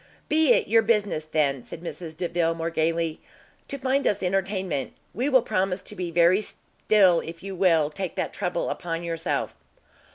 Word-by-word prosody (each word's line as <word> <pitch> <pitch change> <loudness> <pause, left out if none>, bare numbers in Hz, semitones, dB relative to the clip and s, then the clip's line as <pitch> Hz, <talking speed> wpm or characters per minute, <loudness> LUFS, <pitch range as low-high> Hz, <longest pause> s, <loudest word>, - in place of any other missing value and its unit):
"Be 310 -3 +4
it - - +1
your 225 +2 +5
business, 205 -8 0
then," 145 -4 +1
said 160 - -9
Mrs 165 -2 -6
Delvile, 170 -1 0
more 165 0 -3
gaily, 165 0 0 0.5
"to 280 - -4
find 270 +1 +1
us 205 -1 0
entertainment. 190 -5 -1 0.2
We 255 +5 0
will 260 -4 +5
promise 190 -4 -1
to 210 - -7
be 180 -2 -3
very 170 +4 +4
still 195 -4 +2
if 165 +1 -8
you 195 0 -5
will 165 -5 +3
take 185 +2 -5
that - - -2
trouble 180 -3 -2
upon 170 -1 -4
yourself." 165 -1 -2
180 Hz, 170 wpm, -25 LUFS, 165-205 Hz, 0.5 s, your